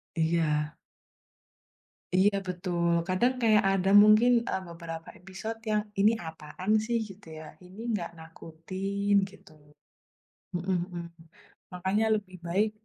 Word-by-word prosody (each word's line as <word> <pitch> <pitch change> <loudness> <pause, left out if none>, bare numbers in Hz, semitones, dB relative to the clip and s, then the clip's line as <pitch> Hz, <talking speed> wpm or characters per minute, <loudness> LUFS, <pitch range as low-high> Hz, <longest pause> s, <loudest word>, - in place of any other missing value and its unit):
Iya. 160 -2 +1 1.4
Iya 200 +2 +4
betul, 175 -1 -1 0.2
kadang 215 +8 +2
kayak 215 -3 +5
ada 190 0 +1
mungkin, 215 +3 +6 0.2
eee, 190 - -1
beberapa 165 -1 -8
episode 195 +5 -7
yang 210 0 +2 0.2
"ini 210 +2 +6 0.2
apaan 160 +5 -5
sih" 235 +1 0
gitu 195 -1 -13
ya, 155 - -9 0.2
"ini 190 +5 -11
nggak 180 -5 -2
nakutin" 185 +5 -4 0.2
gitu, 200 - -18 1.0
mhm 180 +2 -1 0.2
mhm, 175 -1 -5 0.7
makanya 190 +4 0
lebih 200 -3 -6
baik 205 +5 +1
185 Hz, 115 wpm, -28 LUFS, 170-205 Hz, 1.4 s, mungkin